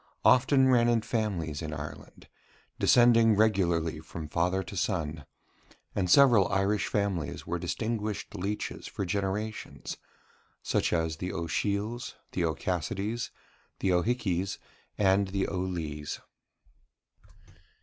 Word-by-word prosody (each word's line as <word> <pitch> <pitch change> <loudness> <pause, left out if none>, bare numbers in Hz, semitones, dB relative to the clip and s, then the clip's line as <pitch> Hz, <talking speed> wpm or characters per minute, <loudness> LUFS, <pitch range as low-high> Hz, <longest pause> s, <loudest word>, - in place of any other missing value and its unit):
often 130 +1 +5
ran 120 -2 +4
in 120 -1 +3
families 100 -10 -2
in 80 -2 -4
Ireland, 75 0 -8 0.5
descending 115 -2 +6
regularly 85 -7 +2
from 80 0 -7
father 90 +4 +1
to 100 - -9
son; 80 -6 -2 0.7
and 90 -3 0
several 120 -4 +6
Irish 100 +1 +1
families 100 -7 -2
were - - -2
distinguished 110 -2 -3
leeches 100 +1 -4
for 100 - -4
generations, 100 +4 -3 0.7
such - - +1
as 80 -2 0
the 90 +2 -3
O'Shiels, 100 +8 -2 0.2
the 90 - -1
O'Cassidys, 95 - -2 0.5
the 95 -2 +1
O'Hickeys, 95 -1 0 0.4
and 100 -1 +3
the 95 0 -1
O'Lees. 85 -6 -3
95 Hz, 110 wpm, -29 LUFS, 85-110 Hz, 0.7 s, descending